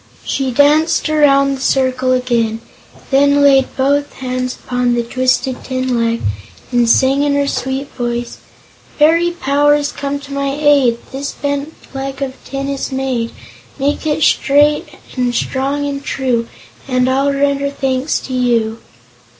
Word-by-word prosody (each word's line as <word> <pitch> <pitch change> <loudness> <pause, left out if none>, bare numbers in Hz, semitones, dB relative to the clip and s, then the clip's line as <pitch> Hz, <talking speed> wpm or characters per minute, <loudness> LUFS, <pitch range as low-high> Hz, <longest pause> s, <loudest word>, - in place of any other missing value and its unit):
She 270 -2 -1
danced 300 +5 +3
around 275 -2 +4
the 265 - -6
circle 260 -1 +1
again, 235 -3 0 0.3
and - - -20
then 285 +1 +4
laid 270 -2 +5
both 285 +2 +1
hands 255 -1 -3
upon 250 -1 -1
the 240 - 0
twisted 255 +1 0
tin 255 -1 -2
leg 230 0 0 0.5
and 240 -2 +2
sang 270 +4 +3
in 290 -1 +1
her 285 0 +1
sweet 265 0 -2
voice: 240 -1 -4 0.6
"Fairy 330 +3 +4
Powers, 290 -2 +1
come 280 0 -3
to 280 0 -9
my 280 0 -1
aid! 280 -6 +4
This 275 +1 -4
bent 285 +2 -3 0.2
leg 270 0 -5
of 265 -1 -4
tin 275 0 -4
is 275 0 -3
made; 260 -3 -2 0.5
Make 290 +3 -1
it 305 0 0
straight 295 +2 +3 0.3
and 250 -2 0
strong 275 +3 -1
and 280 0 -4
true, 245 -5 -1 0.4
And 255 -1 +1
I'll 270 +2 +2
render 280 0 0
thanks 270 0 -1
to 260 - -7
you." 230 -3 0
270 Hz, 150 wpm, -16 LUFS, 255-285 Hz, 0.6 s, laid